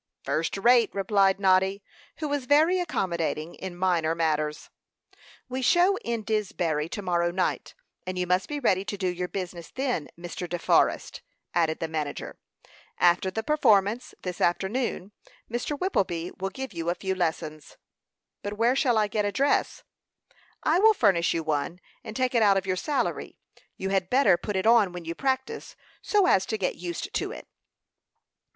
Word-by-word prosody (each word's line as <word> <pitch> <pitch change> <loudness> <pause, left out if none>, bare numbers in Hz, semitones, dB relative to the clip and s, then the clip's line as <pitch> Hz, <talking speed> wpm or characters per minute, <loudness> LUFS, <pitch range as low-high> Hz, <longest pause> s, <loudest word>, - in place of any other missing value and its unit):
"First 165 +4 -1
rate," 235 +2 +5
replied 195 -1 +2
Noddy, 190 +1 +2 0.3
who 310 - -3
was 285 -3 -2
very 315 +6 +4
accommodating 170 - -2
in 185 -2 -7
minor 170 -3 +1
matters. 155 -2 -1 0.8
"We 255 +1 -4
show 355 +8 +4
in 230 -2 -3
Disbury 175 -8 -1
to 205 +2 -5
morrow 175 -1 +1
night, 180 +2 -2 0.3
and 185 0 -3
you 180 - 0
must 180 +1 0
be 295 -1 -3
ready 190 -8 +2
to 205 - -5
do 190 -1 -1
your 180 0 -2
business 180 -3 -6
then, 255 - -2
Mr. 175 0 -6
De 175 - -2
Forrest," - - +1 0.3
added 165 -2 +1
the 165 - -2
manager. 155 -2 -5 0.6
"After 175 +2 +3
the 220 +4 -3
performance 220 -5 +2
this 180 -1 -5
afternoon 195 +2 -1 0.4
Mr. 245 +5 -2
Whippleby 185 - -1
will 195 - -1
give 265 +6 -7
you 165 0 -3
a 175 - 0
few 190 0 -2
lessons." 160 -4 -3 0.6
"But 205 - -4
where 230 +4 +2
shall 255 -4 +2
I 215 - +3
get 210 +1 -1
a 205 - 0
dress?" 285 - +1 0.8
"I 325 +3 +3
will 440 +2 +6
furnish 185 - +3
you 165 - -1
one, 155 +2 -2 0.2
and 220 -2 -8
take 255 0 0
it 235 - +3
out 200 -2 +5
of 190 - -1
your 185 -1 0
salary. 285 +9 -2 0.4
You 190 - -3
had 190 -2 0
better 250 -8 +5
put 200 +4 -5
it 190 - 0
on 220 -5 +5
when 175 -2 -7
you 165 - -3
practice, 265 - -2 0.3
so 410 -3 +2
as 195 - +3
to 220 - -1
get 190 -3 -1
used 175 -1 -5
to - - -2
it." - - -9
195 Hz, 170 wpm, -26 LUFS, 175-240 Hz, 0.8 s, will